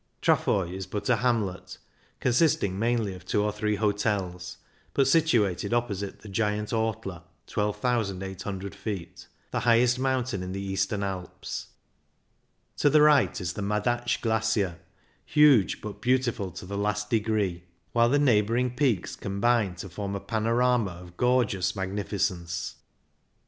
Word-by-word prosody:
Trafoi 90 Hz, -3 st, +2 dB
is 95 Hz, -1 st, -5 dB
but 105 Hz, +4 st, -4 dB
a 120 Hz, -, +4 dB
hamlet, 100 Hz, -7 st, -1 dB, 0.4 s
consisting 120 Hz, -, +2 dB
mainly 115 Hz, -3 st, +1 dB
of 90 Hz, -2 st, -11 dB
two 105 Hz, +3 st, 0 dB
or 105 Hz, -, +1 dB
three 105 Hz, 0 st, -1 dB
hotels, 100 Hz, -4 st, -1 dB, 0.4 s
but 135 Hz, -2 st, +4 dB
situated 120 Hz, -, +2 dB
opposite 100 Hz, -5 st, -2 dB
the 110 Hz, -, -11 dB
giant 105 Hz, +1 st, -1 dB
Ortler 110 Hz, -6 st, -2 dB, 0.2 s
(12,800 100 Hz, -3 st, -2 dB
ft.), 100 Hz, -6 st, -6 dB, 0.2 s
the -, -, 0 dB
highest 120 Hz, +1 st, +3 dB
mountain 130 Hz, -6 st, 0 dB
in 90 Hz, 0 st, -5 dB
the 95 Hz, -, -4 dB
Eastern 100 Hz, +1 st, -1 dB
Alps. 95 Hz, -2 st, -5 dB, 1.1 s
To 145 Hz, -, +4 dB
the 150 Hz, +1 st, +6 dB
right 150 Hz, -5 st, +4 dB
is 90 Hz, -3 st, -3 dB
the 105 Hz, -, -5 dB
Madatsch 120 Hz, +4 st, 0 dB
Glacier, 110 Hz, -6 st, 0 dB, 0.4 s
huge 145 Hz, -9 st, +4 dB
but 105 Hz, -1 st, -7 dB
beautiful 125 Hz, -6 st, +1 dB
to 90 Hz, -, -9 dB
the 100 Hz, +2 st, -4 dB
last 105 Hz, 0 st, -1 dB
degree, 105 Hz, -6 st, 0 dB, 0.3 s
while 115 Hz, 0 st, +4 dB
the 145 Hz, -, +3 dB
neighbouring 120 Hz, -2 st, +2 dB
24 -, -, -13 dB
CYCLING 140 Hz, +2 st, +3 dB
IN 115 Hz, -, +3 dB
THE -, -, -8 dB
ALPS -, -, -7 dB
peaks -, -, -11 dB
combine 100 Hz, -1 st, +1 dB
to 85 Hz, -, -7 dB
form 100 Hz, +2 st, -4 dB
a -, -, -2 dB
panorama 115 Hz, +1 st, +1 dB
of 90 Hz, 0 st, -12 dB
gorgeous 120 Hz, -6 st, +1 dB
magnificence. 95 Hz, -3 st, -2 dB
105 Hz, 150 wpm, -27 LUFS, 95-120 Hz, 1.1 s, the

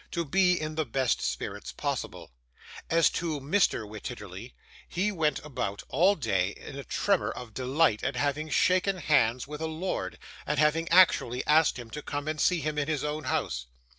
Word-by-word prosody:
to 170 Hz, -1 st, -2 dB
be 180 Hz, +3 st, +3 dB
in 155 Hz, 0 st, -4 dB
the 155 Hz, 0 st, 0 dB
best 130 Hz, -2 st, 0 dB
spirits -, -, -4 dB
possible. -, -, -4 dB, 0.6 s
As 165 Hz, 0 st, +5 dB
to 160 Hz, -3 st, -2 dB
Mr. 140 Hz, -, +1 dB
Wititterly, 105 Hz, 0 st, -8 dB, 0.3 s
he 195 Hz, +5 st, 0 dB
went 160 Hz, -6 st, +1 dB
about 100 Hz, -8 st, -4 dB
all 180 Hz, +9 st, +4 dB
day 100 Hz, -, 0 dB
in 135 Hz, -, -10 dB
a 140 Hz, -, -6 dB
tremor 200 Hz, +5 st, +1 dB
of 115 Hz, -3 st, -8 dB
delight 130 Hz, -1 st, +1 dB
at 130 Hz, -, -1 dB
having 145 Hz, +4 st, -1 dB
shaken 185 Hz, +4 st, +2 dB
hands 130 Hz, -8 st, +2 dB
with 150 Hz, +1 st, -7 dB
a 160 Hz, -, -1 dB
lord, 160 Hz, +4 st, -3 dB, 0.3 s
and 150 Hz, -, 0 dB
having 155 Hz, +3 st, +2 dB
actually 165 Hz, -8 st, +4 dB
asked 155 Hz, -1 st, +4 dB
him 120 Hz, -2 st, -9 dB
to 150 Hz, -, -5 dB
come 145 Hz, 0 st, -4 dB
and 155 Hz, 0 st, -2 dB
see 180 Hz, -3 st, +3 dB
him 150 Hz, +1 st, -2 dB
in 145 Hz, -, -1 dB
his 155 Hz, -3 st, -1 dB
own 150 Hz, +1 st, -3 dB
house. 60 Hz, 0 st, -2 dB
150 Hz, 180 wpm, -28 LUFS, 125-165 Hz, 0.6 s, As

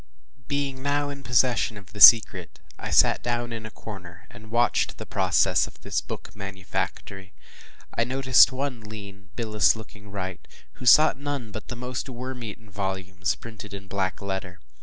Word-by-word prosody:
Being 140 Hz, -2 st, -2 dB
now 145 Hz, +1 st, 0 dB
in 140 Hz, -1 st, -7 dB
possession 125 Hz, -3 st, +1 dB
of 100 Hz, 0 st, -14 dB
the 105 Hz, -, -7 dB
secret, 115 Hz, -1 st, +7 dB, 0.2 s
I -, -, -5 dB
sat -, -, +4 dB
down 120 Hz, 0 st, -2 dB
in 110 Hz, -1 st, -6 dB
a -, -, -9 dB
corner, 90 Hz, -6 st, -11 dB
and 110 Hz, +1 st, -14 dB
watched 120 Hz, +1 st, +1 dB
the -, -, -7 dB
process -, -, +2 dB
of -, -, -14 dB
this -, -, -2 dB
book -, -, -9 dB
manufactory. 95 Hz, 0 st, -5 dB, 0.6 s
I 115 Hz, -, +2 dB
noticed 130 Hz, +1 st, +5 dB
one 130 Hz, -1 st, -3 dB
lean, 100 Hz, -2 st, -11 dB
bilious 105 Hz, -9 st, +2 dB
looking 105 Hz, -2 st, -12 dB
wight, 95 Hz, -2 st, -6 dB, 0.3 s
who 125 Hz, -, -8 dB
sought 155 Hz, +1 st, +6 dB
none 140 Hz, -6 st, -4 dB
but 110 Hz, -, -8 dB
the 120 Hz, -, -6 dB
most 125 Hz, +2 st, -5 dB
worm 125 Hz, 0 st, -7 dB
eaten 110 Hz, -1 st, -9 dB
volumes, 95 Hz, -1 st, -3 dB
printed 110 Hz, -3 st, -10 dB
in 100 Hz, 0 st, -10 dB
black 95 Hz, 0 st, -3 dB
letter. 95 Hz, -2 st, -5 dB
110 Hz, 165 wpm, -25 LUFS, 100-125 Hz, 0.6 s, secret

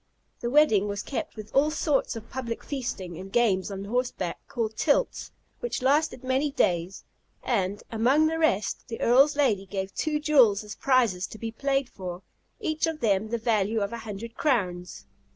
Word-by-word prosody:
The 235 Hz, -, -2 dB
wedding 240 Hz, -8 st, +4 dB
was 205 Hz, 0 st, -3 dB
kept 275 Hz, -, -4 dB
with 215 Hz, -1 st, -10 dB
all 285 Hz, +3 st, +4 dB
sorts 300 Hz, -4 st, 0 dB
of 225 Hz, 0 st, -9 dB
public 235 Hz, -3 st, -4 dB
feasting, 195 Hz, -, -5 dB
and 190 Hz, +1 st, -9 dB
games 205 Hz, -6 st, +2 dB
on 195 Hz, 0 st, -5 dB
horseback, 220 Hz, -6 st, -2 dB
called 220 Hz, -2 st, -3 dB
tilts, 315 Hz, -, +1 dB, 0.3 s
which 485 Hz, -, -3 dB
lasted 285 Hz, 0 st, +2 dB
many 260 Hz, +3 st, +1 dB
days; 180 Hz, -, 0 dB, 0.4 s
and, 200 Hz, -4 st, -1 dB
among 255 Hz, +7 st, +3 dB
the 325 Hz, +1 st, 0 dB
rest, 210 Hz, -11 st, 0 dB
the 230 Hz, -, -6 dB
Earl's 275 Hz, +5 st, +5 dB
lady 220 Hz, -10 st, +1 dB
gave 190 Hz, 0 st, -4 dB
two 305 Hz, -1 st, -1 dB
jewels 255 Hz, -10 st, +4 dB
as 210 Hz, 0 st, -7 dB
prizes 235 Hz, -9 st, +2 dB
to -, -, -10 dB
be 225 Hz, +1 st, -5 dB
played 275 Hz, +2 st, 0 dB
for, 180 Hz, -4 st, -7 dB, 0.4 s
each 315 Hz, +1 st, 0 dB
of 320 Hz, -1 st, -3 dB
them 215 Hz, -3 st, +1 dB
the 235 Hz, -, -1 dB
value 220 Hz, -1 st, +1 dB
of 200 Hz, +2 st, -2 dB
a 235 Hz, -, -4 dB
hundred 225 Hz, +1 st, -7 dB
crowns. 180 Hz, -, -1 dB
230 Hz, 175 wpm, -27 LUFS, 200-275 Hz, 0.4 s, Earl's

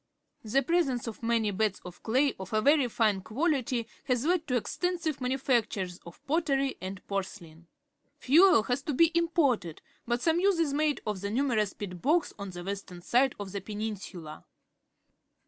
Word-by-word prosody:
The 265 Hz, +5 st, +1 dB
presence 275 Hz, -6 st, +1 dB
of 230 Hz, -1 st, -7 dB
many 230 Hz, -2 st, +1 dB
beds 205 Hz, 0 st, 0 dB
of 180 Hz, -1 st, -10 dB
clay 265 Hz, +5 st, +2 dB
of 190 Hz, +2 st, -8 dB
a 215 Hz, -, +3 dB
very 285 Hz, +1 st, +4 dB
fine 215 Hz, -4 st, +1 dB
qualitj' 255 Hz, -, -1 dB, 0.2 s
has 250 Hz, -1 st, 0 dB
led 340 Hz, -1 st, +1 dB
to 250 Hz, -, 0 dB
extensive 330 Hz, -, -2 dB
manufactures 235 Hz, -8 st, 0 dB
of 170 Hz, -, -14 dB
pottery 275 Hz, -3 st, +1 dB
and 190 Hz, +1 st, -7 dB
porcelain. 175 Hz, -4 st, -6 dB, 0.5 s
Fuel 315 Hz, -, +5 dB
has 245 Hz, +4 st, -1 dB
to 285 Hz, -1 st, -3 dB
be 330 Hz, +4 st, +5 dB
im 335 Hz, 0 st, +2 dB
ported, 250 Hz, -, +1 dB, 0.3 s
but 240 Hz, +1 st, +1 dB
some 330 Hz, 0 st, +3 dB
use 390 Hz, 0 st, +3 dB
is 320 Hz, -4 st, +1 dB
made 300 Hz, 0 st, +1 dB
of 210 Hz, -3 st, -3 dB
the 200 Hz, -, -3 dB
numer 240 Hz, 0 st, +1 dB
ous 205 Hz, -2 st, -2 dB
peat 180 Hz, -4 st, -7 dB
bogs 320 Hz, +4 st, +2 dB
on 200 Hz, -1 st, -5 dB
the 175 Hz, -1 st, -8 dB
western 190 Hz, -2 st, -6 dB
side 255 Hz, +5 st, +2 dB
of 200 Hz, -2 st, -6 dB
the 200 Hz, 0 st, -4 dB
peninsula. 200 Hz, -, -6 dB
240 Hz, 175 wpm, -29 LUFS, 200-285 Hz, 0.5 s, Fuel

